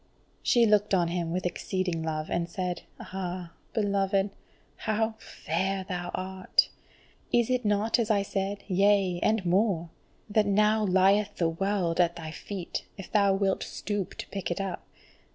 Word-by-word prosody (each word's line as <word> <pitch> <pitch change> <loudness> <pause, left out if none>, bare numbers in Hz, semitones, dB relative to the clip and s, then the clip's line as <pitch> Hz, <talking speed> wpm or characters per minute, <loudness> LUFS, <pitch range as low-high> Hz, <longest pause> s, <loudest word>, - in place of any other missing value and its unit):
She 240 -2 +4
looked 210 -2 +3
on 175 -2 +2
him 170 -1 -2
with 180 +1 -2
exceeding 180 -1 -1
love, 155 -1 -3
and 170 0 0
said: 180 0 -3 0.2
"Ah, 180 -2 -5 0.2
beloved, 200 -2 +1 0.5
how 220 +1 0
fair 190 +4 -2
thou 175 -2 -3
art! 185 0 +1 0.6
Is 240 0 +3
it 250 -1 +1
not 210 +3 +2
as 230 -2 0
I 205 -2 +3
said, 200 0 -3
yea, 195 -2 +3
and 215 -3 +2
more, 175 -2 +2 0.4
that 210 -1 +2
now 210 +2 +3
lieth 200 +2 +3
the 170 -2 +1
world 185 0 0
at 170 -1 +3
thy 160 -2 -6
feet, 185 +1 -5
if 195 - -9
thou 200 -2 +4
wilt 195 -1 +1
stoop 205 -3 -3
to - - -7
pick 195 -3 -4
it 175 - -2
up? 195 -3 -4
195 Hz, 155 wpm, -28 LUFS, 175-205 Hz, 0.6 s, She